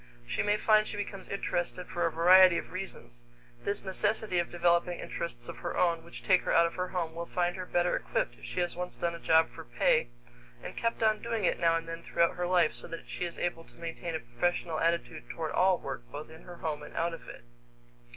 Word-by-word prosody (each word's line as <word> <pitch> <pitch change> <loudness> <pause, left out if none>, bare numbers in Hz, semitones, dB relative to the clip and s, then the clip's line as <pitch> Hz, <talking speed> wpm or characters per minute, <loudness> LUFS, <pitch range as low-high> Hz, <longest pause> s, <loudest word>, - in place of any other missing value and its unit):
She - - -1
may 205 0 +2
find 215 0 +4
she 205 - -5
becomes 200 -1 -5
interested 180 -2 -2
for 175 - 0
a - - -2
variety 180 +2 +7
of - - -5
reasons. - - -8 0.4
This 200 - 0
necessity 205 0 0
of 170 - -1
developing 175 0 +2
interests 120 -8 -4
of - - -7
her 175 - -4
own 170 -2 +2
which 170 - -11
take 185 -2 +4
her - - -2
out 170 - +6
of 170 - -2
her 180 0 -2
home 175 -3 -3
will 170 +1 -5
find 175 -1 0
her 185 -1 -6
better 175 0 +2
equipped - - -1
if - - -20
she 180 - -2
has 175 - -1
once 180 0 -5
done 170 0 -1
a 170 - -7
job 160 -1 +4
for - - -9
pay - - +2 0.6
and - - -7
kept 230 -1 -1
on 215 -1 +3
doing 230 -2 -2
it - - +1
now 165 -1 +4
and 165 0 -2
then 165 0 -5
throughout 170 0 +2
her 180 0 -2
life 175 -3 +3
so - - -5
that 165 0 -8
she 180 - -3
is 170 - -6
able 175 -1 -2
to - - -18
maintain 170 0 -5
a - - -1
professional 175 -2 -1
attitude 165 -8 -1
toward 160 -2 -3
all 185 0 +4
work, 135 -5 -6
both 150 +2 -7
in 160 - -12
her 175 - -9
home 155 -3 -3
and 150 - -11
out 170 0 0
of 165 - -9
it. - - -10
175 Hz, 240 wpm, -30 LUFS, 165-185 Hz, 0.6 s, variety